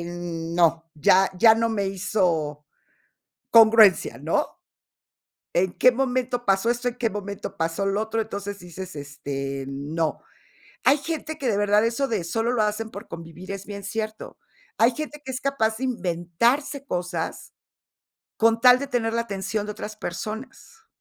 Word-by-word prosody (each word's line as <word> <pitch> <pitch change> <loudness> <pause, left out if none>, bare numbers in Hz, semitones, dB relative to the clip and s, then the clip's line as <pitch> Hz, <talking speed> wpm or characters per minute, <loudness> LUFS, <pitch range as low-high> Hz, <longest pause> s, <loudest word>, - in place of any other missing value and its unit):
n 170 -1 -5
no, 165 -1 +2
ya 185 +6 +4
ya 220 +2 +7
no 230 0 +1
me 200 -3 -1
hizo 175 -7 -1 0.9
congruencia, 220 -7 +6
¿no? 170 - -1 0.9
¿En 180 +1 +2
qué 255 - +6
momento 250 -1 -1
pasó 195 +4 +2
esto? 245 +1 0
¿En 240 - -11
qué 230 -2 0
momento 200 0 -6
pasó 165 +4 -1
lo 200 +2 +1
otro?, 220 +1 -2
entonces 200 -2 -5
dices: 180 0 -9
"Este, 140 -1 -5
no". 150 +4 -2 0.6
Hay 275 +3 +5
gente 315 0 -4
que 260 -4 0
de 200 - +1
verdad 205 +1 +3
eso 240 +4 0
de 210 -8 -1
solo 225 +8 -1
lo 225 - +2
hacen 215 +1 -2
por 205 +3 -9
convivir 165 +3 -9
es 195 0 -6
bien 200 -1 -7
cierto. 215 +2 -5 0.4
Hay 235 +2 +5
gente 300 -1 -6
que 265 - -4
es 255 - -5
capaz 225 -6 0
de 260 - -2
inventarse 235 - 0
cosas, 175 -5 -4 0.8
con 230 0 +3
tal 250 0 +8
de 280 - -3
tener 230 -4 0
la 230 0 +1
atención 205 0 -3
de 210 - -4
otras 215 +1 -7
personas. 220 - -7
210 Hz, 160 wpm, -24 LUFS, 175-235 Hz, 0.9 s, tal